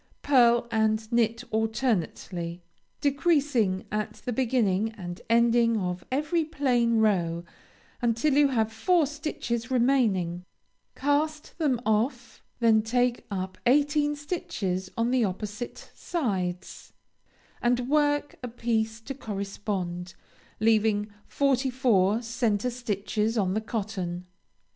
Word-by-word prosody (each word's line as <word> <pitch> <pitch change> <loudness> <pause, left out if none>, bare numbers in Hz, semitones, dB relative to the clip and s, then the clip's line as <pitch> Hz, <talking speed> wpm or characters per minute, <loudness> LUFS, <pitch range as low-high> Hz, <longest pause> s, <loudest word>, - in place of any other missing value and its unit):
Pearl 240 -3 +4
and 220 0 +1
knit 230 0 +1
alternately, 200 -6 -1 0.4
decreasing 280 - +1
at 210 0 -2
the 245 - -5
beginning 225 -5 +1
and 175 -4 -7
ending 235 0 +4
of 180 -2 -3
every 300 +5 +1
plain 250 -7 +1
row, 175 -6 +1 0.6
until 240 +5 +2
you 290 +1 +5
have 225 -4 0
four 330 +9 +3
stitches 270 -5 -4
remaining; 225 -9 +2 0.5
cast 300 +2 -1
them 275 -7 +1
off; 220 +5 -1 0.2
then 225 -2 +5
take 245 +2 0
up 190 -2 -4
eighteen 295 +2 +3
stitches 290 - -3
on 230 +1 +1
the 255 -2 +3
opposite 210 +4 -5
sides, 190 - -3 0.7
and 245 +1 +2
work 290 0 +2
a 250 - -4
piece 225 -2 -1
to 275 - -6
correspond; 195 -6 -4 0.4
leaving 215 -1 +2 0.2
forty 270 -1 +1
four 230 -4 +2
centre 235 0 0
stitches 220 -1 -2
on 190 -3 +1
the 215 - 0
cotton. 195 -6 -4
230 Hz, 110 wpm, -27 LUFS, 205-260 Hz, 0.7 s, you